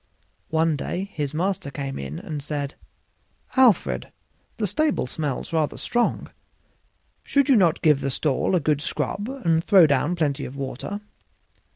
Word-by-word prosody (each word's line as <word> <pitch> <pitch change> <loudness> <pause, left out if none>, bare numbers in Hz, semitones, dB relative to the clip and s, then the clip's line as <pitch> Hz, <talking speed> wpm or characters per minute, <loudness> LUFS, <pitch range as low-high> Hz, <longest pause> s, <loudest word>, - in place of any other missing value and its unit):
One 160 0 +2
day 185 +7 -4
his 145 -3 -2
master 180 +1 -1
came 140 -1 -5
in 70 +2 -5
and 150 -2 -5
said, 145 -1 -3 0.8
"Alfred, 255 -6 +3 0.5
the 215 - 0
stable 295 - +1
smells 145 +3 -4
rather 155 -2 0
strong; 240 -1 -1 0.9
should 280 -2 +2
not 190 - +5
you - - -25
give 150 -4 +4
that 135 - -1
stall 140 +6 0
a - - +4
good 150 -1 +1
scrub 205 +7 -3
and 170 -12 0
throw 190 -4 +7
down 145 +4 +1
plenty 145 -5 0
of 130 - -7
water?" 140 +9 -5
160 Hz, 150 wpm, -24 LUFS, 140-195 Hz, 0.9 s, throw